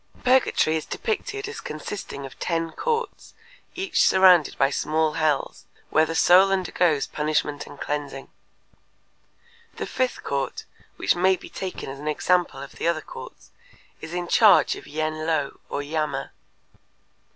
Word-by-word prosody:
Purgatory 250 -11 +3
is 155 - -5
depicted 415 -2 -3
as 440 - -7
consisting 155 -2 -6
of 135 - -12
ten 165 -1 -1
courts 470 - -3 0.4
each 370 -1 +1
surrounded 185 -5 +5
by 135 +1 +3
small 155 +2 0
hells, 155 -3 -1 0.3
where 155 0 +4
the 165 - -4
soul 185 +4 +6
undergoes 175 -5 +1
punishment 150 -1 -2
and 140 - -12
cleansing. 145 -2 -4 1.5
The - - -4
fifth 255 -1 -2
court, 140 -1 -3 0.3
which - - +1
may 185 +2 +3
be - - -12
taken 190 -1 -6
as 135 +1 -7
an 150 - -7
example 175 +3 +1
of - - -10
the - - -2
other 170 -2 +1
courts, - - -11 0.5
is 160 +2 -7
in 175 -1 -3
charge 215 +3 +5
of - - -11
Yen 155 +1 -3
Lo 150 -4 -1
or 145 - -3
Yama. 155 +1 -3
160 Hz, 145 wpm, -24 LUFS, 150-190 Hz, 1.5 s, soul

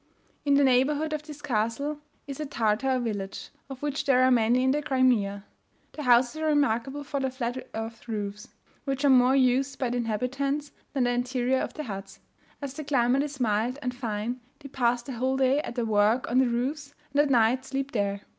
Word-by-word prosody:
In 285 -1 +4
the 285 - +5
neighbourhood 285 +4 +2
of 305 - -2
the 300 0 -9
castle 280 +2 -2 0.3
is 275 0 -7
a 305 - -2
Tartar 250 +1 +1
village, 205 -5 -4 0.2
of 270 0 -9
which 290 -1 -2
there 255 -2 +4
are 260 - +5
many 240 +1 +3
in 260 - +3
the 295 +2 0
Crimea. 240 -8 +1 0.5
The 305 - -7
houses 250 +3 +3
are 315 - 0
remarkable 285 -1 +1
for 285 0 -3
their 265 -1 0
flat 255 0 -4
earth 225 +1 -6
roofs, 210 -2 -4 0.4
which 275 0 -1
are 280 - +6
more 255 +1 +5
used 265 +1 +2
by 255 -3 -1
the 245 - -1
inhabitants 270 +6 -2 0.2
than 270 -3 +1
the 245 - +2
interior 250 +1 0
of - - -4
the 305 - -4
huts; 195 -6 -7 0.4
as 275 -2 -4
the 305 - -6
climate 265 -2 +2
is 290 -1 -5
mild 230 +2 0
and 250 0 -2
fine 235 0 -3 0.2
they 280 - -9
pass 245 -2 +1
the 270 - -7
whole 260 +3 0
day 265 +1 +3
at - - -7
their 240 -2 -1
work 215 +3 +2
on 250 - +4
the 260 - +4
roofs, 280 +5 -3 0.2
and 285 +2 +4
at 295 - +1
night 245 0 +3
sleep 270 +1 -3
there. 200 -2 -1
255 Hz, 205 wpm, -27 LUFS, 235-280 Hz, 0.5 s, are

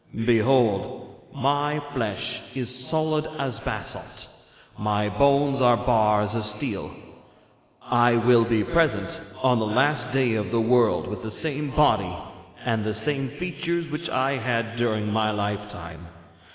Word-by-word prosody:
Behold, 115 -3 +2 0.3
my 145 +3 0
flesh 115 0 -2
is 125 -1 -2
solid 155 +4 +1
as 135 -4 -3
basalt, - - -5 0.5
my 105 0 -1
bones 140 +5 +2
are 120 -1 +5
bars 105 -4 +2
of 115 -2 -2
steel! 105 0 -3 0.9
'I 120 -1 +3
will 120 0 +5
be 115 -2 +1
present 165 +1 0 0.2
on 125 -2 +3
the 110 - -1
last 125 +2 +1
day 130 -3 +2
of 105 -4 -2
the 115 - 0
world 115 0 +3
with 105 +3 -6
the 110 - -5
same 150 +4 0
body 110 -11 +2 0.5
and 110 -2 0
the 105 0 -2
same 135 +3 0
features 170 +2 -3
which 155 +3 -4
I 135 +1 0
had 115 -2 -2
during 110 -3 -1
my 110 -1 +1
lifetime. 100 -5 -5
120 Hz, 140 wpm, -24 LUFS, 105-140 Hz, 0.9 s, are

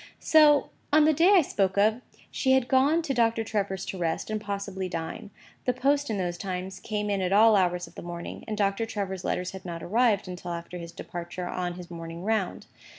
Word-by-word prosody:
So, 300 -2 +5 0.2
on 305 +1 +6
the 310 - +5
day 345 +7 +5
I 360 - +6
spoke 195 -7 0
of, 215 +4 +3 0.3
she 265 -1 +2
had 265 -2 +3
gone 280 +6 +3
to 280 - -1
Doctor 230 -2 +2
Trevor's 200 -4 -2
to 190 - -5
rest, 165 +4 -2
and 215 -1 -2
possibly 200 -2 -4
to 170 - -2
dine. 165 +4 -6 0.4
The 250 - +2
post 280 +2 +1
in 215 - -1
those 175 -2 -2
times, 185 0 -4
came 210 -1 -3
in 200 -1 0
at 180 0 -1
all 215 +2 +6
hours 180 -2 +1
of 165 - -16
the - - -9
morning: 170 0 -7
and 215 -1 -3
Doctor 200 +2 0
Trevor's 190 -4 -4
letters 180 0 -2
had 190 -1 -9
not 170 -2 -6
arrived 215 0 +2
until 180 -1 -6
after 170 +1 -6
his 170 0 -8
departure 175 0 -6
on 175 -1 -3
his 175 -1 -10
morning 165 0 -7
round. 215 -3 -1
195 Hz, 215 wpm, -27 LUFS, 180-230 Hz, 0.4 s, on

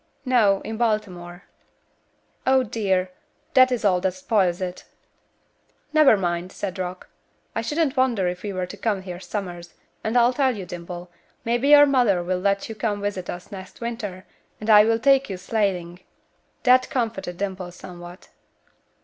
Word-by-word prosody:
"No, 220 -6 +3
in 220 0 -6
Baltimore." 185 -6 -2 1.0
"Oh, 260 0 +4
dear, 190 -5 -1 0.4
that 255 -1 +6
is 240 -3 -1
all 180 -3 +3
that 190 -1 -1
spoils 185 -2 +1
it." 180 -1 -5 1.1
"Never 305 -8 +6
mind," 175 -1 -2
said 190 -2 -5
Rock. 180 0 -5 0.5
"I 225 - -1
shouldn't 295 +4 0
wonder 245 -8 +2
if 180 0 -3
we 205 - -4
were 185 -1 -2
to 180 - -9
come 200 -2 -1
here 180 -2 -7
summers, 175 -3 -6 0.3
and 220 +3 0
I'll 240 +1 +4
tell 260 -3 +1
you, 190 - -6
Dimple, 175 0 -8 0.3
maybe 240 +3 +1
your 290 0 +9
mother 245 -10 +2
will 180 +1 -1
let 200 +1 0
you 225 - -6
come 215 -2 -2
visit 200 -3 -4
us 175 +4 -7
next 190 -1 -10
winter, 220 -6 -5 0.3
and 215 +1 0
I 210 0 +8
will 225 0 +2
take 275 +2 +3
you 190 - -4
sleighing." 180 -3 -2 0.6
That 255 0 +5
comforted 225 -8 -3
Dimple 190 -2 -4
somewhat. 175 0 -11
200 Hz, 160 wpm, -23 LUFS, 180-235 Hz, 1.1 s, your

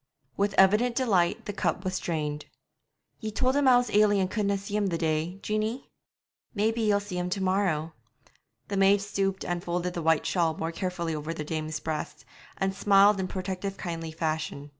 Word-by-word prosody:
With 200 0 0
evident 210 +6 +4
delight 215 -3 +1
the 205 - -4
cup 190 -2 -1
was 185 0 -1
drained. 150 -3 -3 0.7
'Ye 220 - -4
told 255 +5 0
him 285 -1 +3
I 250 -1 +7
was 245 -3 0
ailing 205 -1 +4
and 190 0 0
couldna 200 -2 0
see 200 +1 -6
him 210 -1 +1
the 170 -3 -1
day, 160 +2 -1
Jeanie?' 215 +4 -2 0.6
'Maybe 220 +3 +1
ye'll 210 -2 +3
see 200 -3 -5
him 180 0 -2
to 195 +2 -2
morrow.' 180 -5 0 0.8
The 200 - -2
maid 195 +1 +5
stooped 195 -1 -2
and 175 -1 -2
folded 175 +1 -2
the 170 - -3
white 160 -1 +2
shawl 165 -3 +1
more 165 +1 -2
carefully 170 -2 -3
over 155 +2 -4
the 155 - -4
dame's 155 0 -3
breast, 155 -1 -5 0.3
and 195 0 0
smiled 200 +1 +5
in 185 - -1
protective 190 +1 -4
kindly 165 -2 -5
fashion. 155 -2 -3
190 Hz, 185 wpm, -27 LUFS, 165-205 Hz, 0.8 s, I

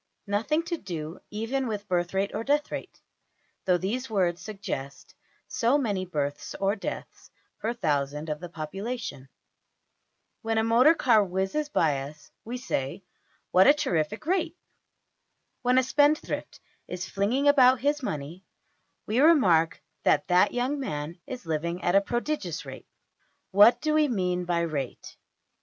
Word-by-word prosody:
Nothing 225 +11 0
to 340 0 -3
do 165 - -6
even 235 +5 -2
with 210 -2 -4
birth 175 0 -1
rate 195 +1 0
or - - -3
death 290 +3 +1
rate, - - -7 0.7
though 180 -1 +3
these 230 +8 -3
words 180 -5 0
suggest 195 -10 -6 0.3
so 240 +5 +2
many 205 -9 -1
births 145 -4 -3
or 195 +1 +1
deaths 200 - -7 0.3
per 225 - -1
thousand 150 - -1
of 150 -1 -3
the 175 - -8
population. 165 - -6 1.1
When 225 0 -1
a 220 - +3
motor 245 +8 +5
car 230 -8 +4
whizzes 190 +11 -2
by 150 - +1
us, 145 +2 -10
we 240 +3 -5
say: 165 - -3 0.5
What 185 +1 +6
a 285 - +7
terrific 205 - -1
rate! 350 0 0 1.0
When 250 +1 +2
a 260 - +5
spendthrift 290 +4 +1 0.3
is 180 +1 -5
flinging 235 +9 0
about 260 -3 +6
his 290 +2 +1
money, 160 - -5 0.6
we 220 +4 0
remark 185 - +4 0.2
that 145 - +2
that 180 0 +4
young 255 +4 -1
man 155 - -4
is 250 -7 -7
living 170 +3 -2
at 175 - +2
a 195 - +6
prodigious 240 +8 -3
rate. - - -10
\DPPageSep{065.png}% - - -46
What 215 +5 +6
do 305 -1 0
we 305 -1 +4
mean 180 -7 -1
by 170 -1 0
\emph{rate}? 140 -6 -5
200 Hz, 150 wpm, -27 LUFS, 170-255 Hz, 1.1 s, a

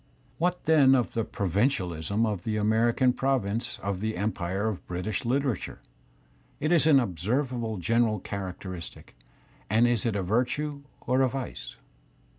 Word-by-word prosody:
What, 180 +1 0
then, 145 -4 +6
of 125 -3 0
the 115 - 0
provincia 100 - 0
lism" 90 +7 -1
of 105 -5 -2
the 110 - -1
Asienean 115 +4 +2
prov 135 -5 +1
A - - -2
inoe 115 +4 -3
of 100 -1 -2
the 110 0 -2
empire 100 0 -1
of 105 -4 -3
British 90 +3 -2
Uterature? 130 0 -1 0.8
Is 155 - 0
it 160 -2 +4
an 140 -3 +7
observable 115 - -1
general 110 +3 +1
characteristic, 95 -2 -7 0.5
and 110 +4 +4
is 120 -3 +2
it 110 - -1
a 100 - -1
virtue 130 +8 -1 0.2
or 130 +2 +1
a 130 - +3
vice? 125 - -6
115 Hz, 155 wpm, -27 LUFS, 100-130 Hz, 0.8 s, an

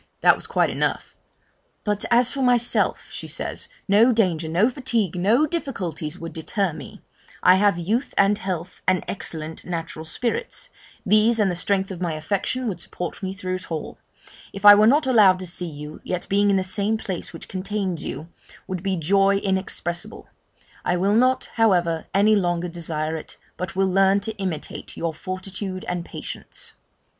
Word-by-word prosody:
This - - +8
was - - -4
quite - - +2
enough: - - -2 0.7
'But 210 -1 -1
as 245 +1 +4
for 275 - -3
myself,' 245 -2 +2
she - - -6
says, - - -4 0.2
'no 215 +5 +5
danger, 175 -8 +1
no 180 +7 +3
fatigue, 235 - 0
no 215 +11 +3
difficulties, 180 - -4
would 165 -2 -7
deter 180 +2 -1
me 145 -4 -10 0.4
I 180 - +8
have 200 -2 +3
youth, 215 +10 -1
and 200 +1 +5
health, 185 -3 -5
and 185 -1 +2
excellent 160 -4 -6
natural 165 -2 -5
spirits 245 - -3 0.3
these 215 +3 +4
and 205 -4 +2
the - - -3
strength 195 +2 0
of 180 -2 -7
my 170 -3 -1
affection 200 +10 -2
would 190 -5 -3
support 175 0 -6
me 190 -1 -3
through 185 -1 -3
it 185 - -12
all; 160 -2 -5 0.5
if 195 +1 -6
I 205 - +12
were 210 +1 +6
not 290 +5 +4
allowed 210 -8 +6
to 185 - -6
see 175 0 -3
you, 150 0 -9
yet 180 -1 -3
being 205 +1 +3
in 200 - +4
the 190 - +1
same 205 +3 0
place 190 -5 -5
which 165 - -10
contains 190 -3 -3
you, 155 - -5 0.4
would 185 -2 -4
be 195 0 0
joy 195 +4 +3
inexpressible! 190 0 -2 0.6
I 180 - +1
will 195 +3 +2
not, 255 +3 +2
however, 175 -7 +2
any 205 +3 +4
longer 175 -3 0
desire 160 -2 -3
it, 160 - -8 0.2
but 180 +1 -5
will 195 0 +2
learn 195 +1 +4
to 220 +2 -4
imitate 185 -6 -5
your 165 -1 -2
fortitude 185 +3 -6
and 175 -1 -2
patience.' - - -8
190 Hz, 175 wpm, -23 LUFS, 175-210 Hz, 0.7 s, I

